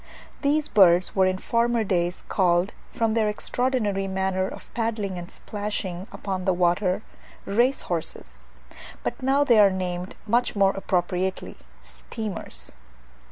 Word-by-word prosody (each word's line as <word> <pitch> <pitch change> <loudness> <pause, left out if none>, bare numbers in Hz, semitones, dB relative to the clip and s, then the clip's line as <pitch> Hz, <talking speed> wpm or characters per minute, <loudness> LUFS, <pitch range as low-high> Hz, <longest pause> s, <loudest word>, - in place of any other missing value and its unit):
These 300 +1 +2
birds 180 -3 +5
were 190 -1 +4
in 185 0 0
former 235 +3 +1
days 175 -3 -1
called, 180 +1 +2 0.2
from 225 -1 0
their 220 -2 +2
extraordinary 210 -3 -1
manner 190 0 0
of - - -11
paddling 215 -5 -2
and 175 +1 -8
splashing 205 -3 -4
upon 190 -2 -4
the 190 - +3
water, 180 +3 +1 0.4
race 240 +7 +2
horses; 65 - -3 0.6
but - - -3
now 270 +2 +3
they 235 -6 +5
are 205 -1 +8
named, 180 -1 -4
much 235 +3 +1
more 195 -1 +4
appropriately, 185 -1 -2 0.3
steamers. 65 - -5
195 Hz, 130 wpm, -25 LUFS, 180-220 Hz, 0.6 s, are